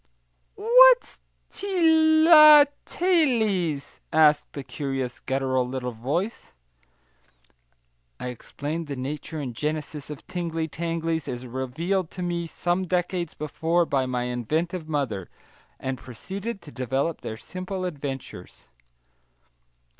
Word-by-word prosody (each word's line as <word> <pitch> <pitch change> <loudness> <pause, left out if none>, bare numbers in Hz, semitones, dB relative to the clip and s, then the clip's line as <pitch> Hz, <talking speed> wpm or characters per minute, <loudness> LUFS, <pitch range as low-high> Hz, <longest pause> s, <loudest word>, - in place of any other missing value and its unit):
"What's - - +6 0.3
ti 320 -5 +3
ly 305 -3 +10 0.2
ta 355 - -4
lies?" 220 - +1
asked 150 -2 +3
a 140 - -4
curious, 135 -3 -4
guttural 130 -1 -1
little 125 -1 -4
voice. 145 - -4 1.6
I 125 - -4
explained 150 +6 -5
the 140 - -4
nature 150 +4 -5
and 130 -5 -5
genesis 150 0 -4
of 150 -2 -8
tingly 170 -3 -3
tanglies, 165 0 -3
as 125 0 -5
revealed 155 +9 -2
to 180 - -3
me 170 -1 -2
some 175 +3 -1
decades 180 -1 -1
before 165 +3 0
by 135 -4 0
my 125 -1 -1
inventive 155 +8 -2
mother, 125 - -2 0.5
and 130 -1 -4
proceeded 195 - -6
to 150 - -11
develop 135 +5 -2
their 110 - -6
simple 185 - -5
adventures. 135 - -7
160 Hz, 115 wpm, -25 LUFS, 135-185 Hz, 1.6 s, ly